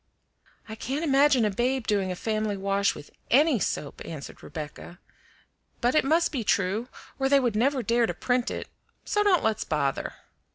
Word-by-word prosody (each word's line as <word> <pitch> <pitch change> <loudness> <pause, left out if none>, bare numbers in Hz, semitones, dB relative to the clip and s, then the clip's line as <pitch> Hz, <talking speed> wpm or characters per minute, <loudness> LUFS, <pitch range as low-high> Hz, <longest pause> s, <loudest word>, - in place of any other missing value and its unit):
"I 220 - -7
can't 265 +7 -3
imagine 275 -4 +4
a 210 - +1
babe 245 +4 0
doing 200 -3 0
a - - -3
family 215 0 -2
wash 195 +1 +1
with 145 - -11 0.2
ANY 285 -1 +4
soap," 150 -4 -3
answered 155 -4 -8
Rebecca; 155 +3 -8 0.8
"but 245 0 +2
it 305 - +4
must 320 +5 +2
be 260 -6 -2
true 200 +3 0 0.3
or 270 0 +1
they 280 0 +6
would 240 -5 0
never 260 +3 +1
dare 235 0 +2
to - - -2
print 245 -1 0
it, - - -5 0.4
so 415 - +1
don't 400 -4 +3
let's 220 -2 +1
bother. 140 -3 -1
230 Hz, 175 wpm, -27 LUFS, 200-270 Hz, 0.8 s, they